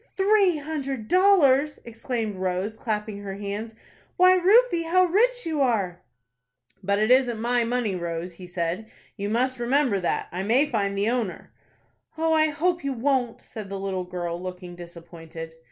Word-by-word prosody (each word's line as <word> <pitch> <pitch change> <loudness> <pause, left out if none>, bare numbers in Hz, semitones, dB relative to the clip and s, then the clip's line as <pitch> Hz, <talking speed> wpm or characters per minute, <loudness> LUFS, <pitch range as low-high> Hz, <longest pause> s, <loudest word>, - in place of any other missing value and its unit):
"Three 390 -3 +4
hundred 275 -6 -4
dollars!" 305 - +4
exclaimed 230 -3 -4
Rose, 185 +3 -2
clapping 210 -2 -3
her 195 -1 -6
hands. 205 +3 -5 0.4
"Why 365 +1 +7
Rufie, 370 -1 +4
how 370 +3 +4
rich 485 +8 +2
you 315 -3 -1
are!" 200 -9 0 0.8
"But 200 +1 0
it 215 +3 +2
isn't 250 -3 +3
my 240 +1 +1
money, 235 -3 -1
Rose," 170 0 -4
he 180 +1 -11
said. 175 +4 -3 0.3
"You 200 -1 -4
must 255 +3 0
remember 245 -3 +1
that. 175 - -1
I 180 - -3
may 235 +9 +3
find 200 -7 -1
the 205 +3 +1
owner." 235 -7 -3 0.6
"Oh, 325 0 +1
I 315 0 +4
hope 340 +3 -1
you 275 -1 -1
won't," 250 -1 0
said 215 -3 -9
the 195 0 -5
little 190 -1 -3
girl, 175 -1 -4
looking 180 -1 -7
disappointed. 165 -1 -10
225 Hz, 160 wpm, -25 LUFS, 190-290 Hz, 0.8 s, Why